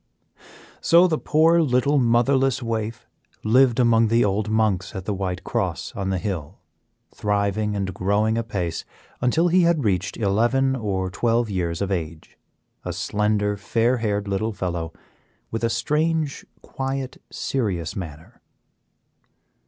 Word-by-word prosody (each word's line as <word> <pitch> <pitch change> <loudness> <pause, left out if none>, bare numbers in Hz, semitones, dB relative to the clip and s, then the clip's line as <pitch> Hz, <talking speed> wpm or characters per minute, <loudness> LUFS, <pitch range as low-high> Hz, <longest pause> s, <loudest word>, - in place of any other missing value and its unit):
So 170 +2 +6
the 155 -3 0
poor, 165 +2 +4
little, 140 0 +2
motherless 130 +2 +2
waif 110 -1 -3 0.4
lived 125 +2 +4
among 115 -2 +4
the 115 +1 +3
old 105 +2 0
monks 110 -4 0
at 95 -1 -5
the 105 - -1
White 95 -1 -3
Cross - - -2
on 95 -1 -2
the 95 - 0
hill, 90 -4 -4 0.6
thriving 105 0 0
and 95 -2 -2
growing 105 +4 +1
apace 100 -8 -3 0.4
until 160 +8 +3
he 180 +2 +4
had 170 -4 +2
reached 95 -2 0
eleven 120 +6 +2
or 95 -6 -2
twelve 115 +2 +1
years 85 -1 -1
of 100 - -3
age; 80 -3 -4 0.5
a - - -4
slender, 105 0 0
fair 115 +5 +1
haired 105 -3 -1
little 105 +3 -1
fellow, 85 -4 -3 0.6
with 115 +1 -3
a 115 - +2
strange, 150 +5 -1 0.2
quiet 135 -1 -4
serious 95 - -2
manner. 80 -5 -8
110 Hz, 135 wpm, -23 LUFS, 95-125 Hz, 0.6 s, So